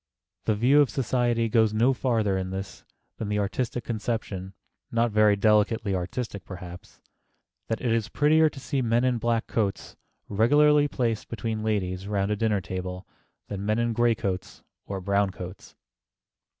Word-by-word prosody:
The 110 - +2
view 130 +7 +5
of 140 - +3
society 120 -2 +1
goes 110 -2 +2
no 120 +5 +4
farther 115 -6 0
in 95 0 -2
this 95 +1 -6 0.3
than 110 - -4
the 105 - 0
artistic 115 +4 -2
conception 105 -5 -4 0.4
(not 115 0 +1
very 105 -1 +4
delicately 105 0 +2
artistic, 95 +3 -4
perhaps) 90 -1 -10 0.7
that 115 - -2
it 120 - 0
is 110 -2 0
prettier 155 +5 +4
to 140 - -11
see 135 +1 -2
men 120 0 +2
in 125 -2 +1
black 115 0 0
coats 100 -4 -2 0.3
regularly 145 +7 +4
placed 115 -6 -2
between 115 -1 -3
ladies 95 -3 -2
round 100 0 0
a - - +2
dinner 105 -2 +1
table 90 +1 -5 0.4
than 100 -1 -5
men 110 +1 +1
in 120 0 0
gray 120 0 +3
coats 95 -3 -4 0.2
or 100 -1 -4
brown 100 +1 +1
coats. 90 0 -9
110 Hz, 160 wpm, -26 LUFS, 100-120 Hz, 0.7 s, view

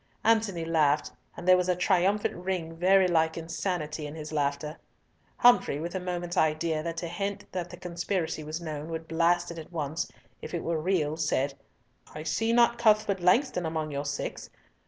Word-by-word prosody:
Antony 215 -7 +2
laughed, 155 -3 +2 0.3
and 175 - -7
there 185 - +8
was 180 0 +1
a 180 - +3
triumphant 190 +3 +2
ring 175 -2 -3
very 185 +2 +4
like 160 -2 +2
insanity 165 -2 -3
in 145 - -8
his 155 -1 -7
laughter. 150 0 -1 0.6
Humfrey, 240 -11 +5
with 170 +2 -4
a 190 - -1
moment's 175 -1 -4
idea 155 0 +1
that 165 +1 -4
to 170 - -3
hint 200 +4 -3
that 175 -2 -4
the 175 - -9
conspiracy 175 -2 -3
was 155 +2 -4
known 155 -2 -5
would 160 0 -5
blast 175 +1 +2
it 170 - -7
at 160 - -10
once, 160 -1 -3 0.3
if - - -5
it 170 - -3
were 165 -2 -1
real, 160 -4 0
said, 145 -3 0 0.6
"I 155 - -5
see 225 +7 0
not 235 0 +4
Cuthbert 215 -3 +3
Langston 180 +2 +3
among 160 -1 -2
your 140 0 -3
six. 145 0 -4
170 Hz, 180 wpm, -28 LUFS, 155-185 Hz, 0.6 s, there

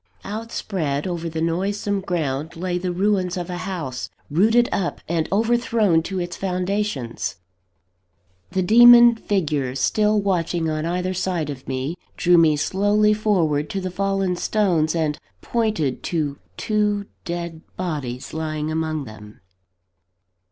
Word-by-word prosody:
Outspread 195 -9 -3
over 170 -2 -3
the 160 0 -3
noisome 195 +4 -1
ground 160 -4 -2
lay 180 +1 -2
the 180 0 -2
ruins 185 -1 0
of 175 0 -4
a 175 - -4
house, 140 -9 -4 0.2
rooted 225 +9 +4
up 180 -3 -1
and 165 -1 -1
overthrown 225 -4 +2
to 185 +3 -4
its 175 0 -4
foundations. 185 - -2 1.1
The 185 - 0
demon 240 +3 +8
figures, 150 - -1
still 210 +8 +2
watching 175 -4 0
on 155 +1 -2
either 180 +2 -1
side 175 -5 -1
of 130 -2 -10
me, 135 +5 -2 0.2
drew 175 -1 +5
me 160 -2 +5
slowly 205 +6 +2
forward 170 -9 +1
to 195 - -2
the 185 -1 -4
fallen 195 -1 0
stones, 175 -7 +1
and 155 -3 0 0.2
pointed 215 - -1
to 150 -5 -2 0.2
two 210 -1 0 0.2
dead 170 -2 -5 0.2
bodies 145 -9 -4
lying 155 -1 -3
among 155 -1 -1
them. 105 -2 -12
175 Hz, 130 wpm, -22 LUFS, 155-200 Hz, 1.1 s, demon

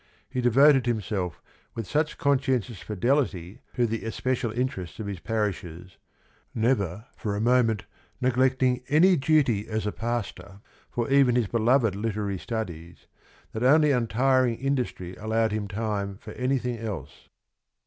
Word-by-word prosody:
He 125 - -3
devoted 130 +2 +5
himself 100 -6 -2 0.3
with 115 - -4
such 150 +7 -1
conscientious 130 -6 0
fidelity 105 - -1
to 120 - +2
the 115 0 -3
especial 120 +1 -2
interests 115 -7 -3
of 110 - -4
his 100 -3 -5
parishes, 90 -5 -4 0.6
never 110 -4 0
for 105 -2 -3
a - - -2
moment 115 -2 +2 0.3
neglecting 130 0 +2
any 175 +6 +5
duty 135 -8 +2
as 110 -1 -2
a 105 - 0
pastor 100 -5 -5 0.3
for 120 -1 -2
even 135 -3 +5
his 120 -2 +2
beloved 115 0 +2
literary 105 -2 -2
studies, 85 -8 -6 0.5
that 110 - -5
only 150 +4 +5
untiring 125 0 +2
industry 125 -10 -2
allowed 110 +1 0
him 105 -1 -2
time 100 -2 -3
for 105 - -11
anything 125 -1 -1
else. 95 -10 -7
115 Hz, 135 wpm, -26 LUFS, 100-130 Hz, 0.6 s, devoted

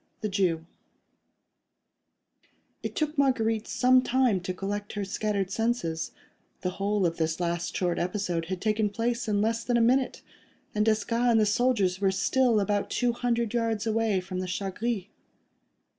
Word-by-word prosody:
THE 215 - -1
JEW 180 -5 0 2.2
It - - -5
took 305 -1 -1
Marguerite 225 -5 +1
some 255 0 +4
time 255 -5 +2
to 185 +1 -4
collect 205 +2 -4
her 205 -1 -2
scattered 200 -1 -1
senses; 225 -8 -1 0.5
the 180 - -1
whole 200 +1 0
of 170 -1 0
this 160 0 -1
last 170 -1 -2
short 175 -2 0
episode 180 -2 -1
had 185 +1 -4
taken 215 -1 +1
place 230 +3 -2
in 205 -1 +1
less 225 +1 0
than 240 +1 +1
a - - +3
minute, 250 +3 +2 0.5
and 210 - +2
Desgas 230 +3 +2
and 230 -1 +5
the 215 - +4
soldiers 205 -4 +1
were 195 - +4
still 230 +4 +2
about 205 0 0
two 245 -1 +1
hundred 235 -2 -1
yards 230 -3 0
away 220 -3 +1
from 185 0 -5
the 185 - -3
"Chat 190 +1 -3
Gris." 230 -3 -1
210 Hz, 160 wpm, -27 LUFS, 190-235 Hz, 2.2 s, and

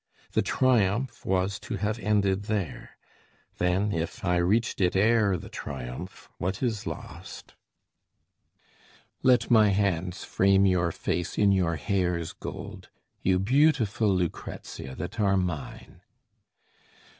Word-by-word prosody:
The - - +2
triumph 120 -1 +1
was 95 +2 0
to 115 - -5
have 105 +3 -2
ended 100 -2 +1
there; 100 -7 -4 0.6
then, 90 +4 +1
if 85 +1 -3
I 90 -1 +2
reached 100 +6 +1
it 90 0 +2
ere 105 -1 +3
the - - -9
triumph, 65 -3 -7
what 95 +6 -2
is 110 -5 -1
lost? - - -8 1.7
Let 125 -1 +3
my 110 -3 +6
hands 95 -3 0
frame 100 0 +3
your 90 -3 +2
face 85 +1 -3
in 100 -1 +4
your 90 -4 +2
hair's 85 +2 -1
gold, - - -8 0.3
You 95 0 +2
beautiful 115 -1 +2
Lucrezia 85 -6 -4
that 115 - -6
are 100 -2 +3
mine! 90 -5 -4
95 Hz, 120 wpm, -27 LUFS, 90-105 Hz, 1.7 s, my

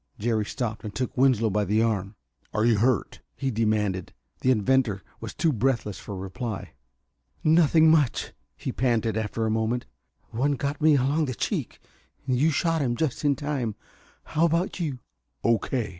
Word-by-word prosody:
Jerry 110 -1 0
stopped 115 -2 -4
and 105 -2 -7
took 130 -1 -2
Winslow 125 -4 +3
by 105 +1 +1
the 105 +3 +2
arm. 100 -3 -1 0.4
"Are 110 +1 +2
you 115 -3 +4
hurt?" 120 0 +1 0.2
he 135 -1 -2
demanded. 105 -5 0 0.3
The 130 - +1
inventor 115 -4 +2 0.2
was - - -7
too 160 -3 +2
breathless 115 -4 0
for 100 - -7
reply. 95 +3 -5 0.7
"Nothing 160 0 +5
much," 150 -6 +1 0.2
he - - -4
panted, 115 -3 0
after 110 +1 -1
a 110 - 0
moment. 110 +2 0 0.5
"One 135 +6 +1
got 140 +2 -3
me 155 -1 +6
along 140 +4 +2
the 130 -3 -4
cheek - - -3 0.5
you 135 +4 +2
shot 165 +1 +1
him 120 -3 0
just 155 +1 -2
in 145 -1 +3
time. 135 -7 -2 0.5
How 160 +2 +1
about 170 +4 0
you?" 150 -7 -2 0.5
"O.K. 115 0 +1
120 Hz, 160 wpm, -26 LUFS, 110-140 Hz, 0.7 s, me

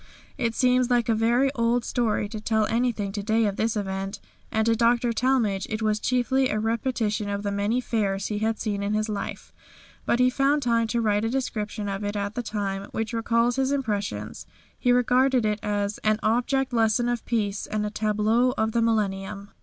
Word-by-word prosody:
It 230 -3 -1
seems 250 0 +3
like 240 -2 +2
a - - +4
very 240 +5 +2
old 235 -1 +1
story 220 -3 0
to 215 0 -6
tell 220 0 +1
anything 225 -3 0
to 205 +1 -4
day 220 +2 +2
of 200 -2 -1
this 220 +1 0
event, 195 0 -3 0.3
and 220 0 +1
to 230 0 +3
Dr. 235 +1 +2
Talmage 230 -6 +1
it 220 0 -3
was 215 0 +1
chiefly 255 +3 +1
a 215 - 0
repetition 225 -2 -1
of 200 0 -3
the 200 - -1
many 205 +4 0
Fairs 200 -5 -1
he 210 -1 -2
had 220 0 -1
seen 205 -2 -2
in 205 +1 -1
his 215 +1 -1
life, 205 -2 -5 0.5
but - - +3
he 250 0 +4
found 280 +2 +2
time 230 -1 +2
to 235 +1 0
write 210 -1 +1
a 225 - 0
description 215 -5 -3
of 195 +1 -3
it 205 0 -3
at 200 0 -2
the 245 - -2
time, 200 -3 -3
which 225 +1 -3
recalls 230 +2 +1
his 265 0 +1
impressions. 205 - -3 0.3
He 245 - +2
regarded 250 0 +3
it 210 0 0
as 205 -1 -2
"An 215 0 +1
Object 250 +4 +1
Lesson 225 +1 +2
of 240 -1 -1
Peace 210 -4 -1
and 215 0 -2
a 210 - -3
Tableau 220 +4 +1
of 220 0 +1
the 235 - +1
Millennium." 200 -3 -1
220 Hz, 200 wpm, -25 LUFS, 210-240 Hz, 0.5 s, a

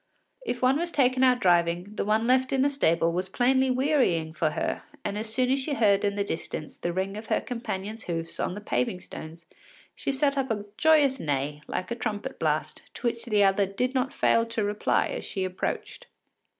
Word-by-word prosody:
If 250 - -3
one 265 +3 +4
was 345 +1 -1
taken 255 -3 +3
out 250 -1 +5
driving, 175 +1 +2
the - - -1
one 215 +2 +1
left 260 +1 +3
in 265 -1 +2
the 285 - +2
stable 170 - +2
was 180 +2 -2
plainly 260 +4 +2
wearying 250 - +1
for 160 -1 +1
her, 150 - -2 0.2
and 200 - -2
as 215 +1 -4
soon 250 +2 +2
as 270 - +2
she 285 +2 -2
heard 200 -5 +3
in 200 -1 +1
the 205 - 0
distance 160 -4 -5
the 175 - -3
ring 190 +3 -2
of 215 +1 -7
her - - +2
companion’s 220 -3 -5
hoofs 165 -1 -4
on 180 - -1
the 205 - -7
paving 125 +1 -1
stones, 165 -1 -10 0.5
she - - -2
set 280 +1 +1
up 265 -1 -1
a 210 -2 -2
joyous 295 -3 +4
neigh, 145 0 -2
like 185 - -4
a - - 0
trumpet 220 +3 -4
blast, - - -1
to - - -8
which 235 -1 -1
the 210 -4 +3
other 195 0 +3
did 250 +7 -1
not 260 +1 0
fail 230 - +3
to 230 -1 -2
reply 205 +1 +1
as - - -4
she 190 - -3
approached. 185 - -4
215 Hz, 210 wpm, -27 LUFS, 185-260 Hz, 0.5 s, out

